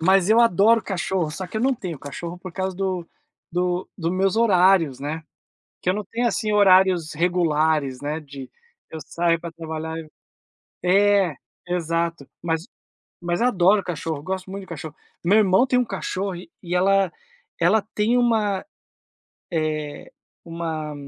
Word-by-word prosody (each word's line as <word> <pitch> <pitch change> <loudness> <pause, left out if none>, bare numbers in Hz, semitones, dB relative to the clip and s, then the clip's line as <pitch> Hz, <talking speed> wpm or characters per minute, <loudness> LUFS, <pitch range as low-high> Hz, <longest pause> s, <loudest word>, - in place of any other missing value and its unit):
mas 190 +3 +4
eu 230 +2 +6
adoro 225 +1 +4
cachorro, 180 -3 -2
só 185 +4 -5
que 205 - -7
eu - - 0
não 265 +2 +2
tenho 175 - -6
cachorro 170 +5 -7
por 185 -1 -9
causa 190 0 -3
do 185 -3 -2 0.4
do 180 +1 -1
dos 165 -1 -2
meus 195 +2 +1
horários, 185 - +4
né, 155 +3 -4 0.6
que 180 - +2
eu - - +1
não 210 - -2
tenho, 235 +5 -2
assim, 215 -2 0
horários 185 -5 +4
regulares, 155 -5 +1
né, 150 +2 -3
de 140 -3 -10 0.4
eu 160 - -6
saio 170 +1 +1
para 170 0 -7
trabalhar 160 0 -5
eu 160 -1 -8 0.7
É, 195 -2 +3 0.3
exato. 165 -3 -1
Mas 165 +1 -1 0.6
mas 175 +2 -1
adoro 205 -4 +4
cachorro, 160 -4 -4
gosto 190 +2 -4
muito 195 +1 -5
de - - -14
cachorro. 160 -2 -7 0.3
Meu 190 +5 +4
irmão 200 +3 +4
tem 250 -1 +2
um - - +3
cachorro 195 -2 -3
e 175 - -7
ela 195 0 +3 0.5
ela 195 +6 +4
tem 220 +4 +2
uma, 220 -5 +1 0.9
eh, 155 -2 -3 0.3
uma 165 -2 -4
180 Hz, 155 wpm, -23 LUFS, 160-195 Hz, 0.9 s, eu